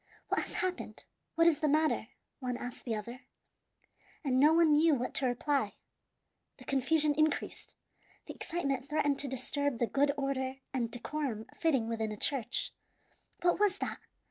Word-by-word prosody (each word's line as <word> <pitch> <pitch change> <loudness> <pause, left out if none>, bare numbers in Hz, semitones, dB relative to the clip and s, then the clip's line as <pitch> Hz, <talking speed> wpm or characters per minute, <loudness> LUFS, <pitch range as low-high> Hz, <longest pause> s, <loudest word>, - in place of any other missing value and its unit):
"What - - +2
has - - -5
happened? 365 -1 -3 0.3
What 330 0 +4
is 335 -4 +4
the 305 - +1
matter?" 310 +2 +2 0.3
one 250 -2 -2
asked 245 0 -7
the 230 -3 -1
other, 235 +4 -6 1.0
and 260 -3 +2
no 295 +3 +7
one 330 -1 +5
knew 310 +1 +5
what 250 -1 -3
to 265 - +1
reply. 250 -2 0 0.8
The - - -13
confusion 295 +3 +2
increased. 310 +1 -1 0.5
The - - -7
excitement 275 -6 -2
threatened 290 -2 +1
to 285 - 0
disturb 265 +1 -1
the 235 - +2
good 280 +4 +2
order 265 -1 -1 0.2
and 240 -3 0
decorum 245 -2 -3
fitting 270 -9 +1
within 225 -1 -2
a 210 - -5
church. 250 0 0 0.7
"What 350 +1 +3
was 410 -2 +3
that?" - - -3
275 Hz, 160 wpm, -32 LUFS, 245-305 Hz, 1.0 s, no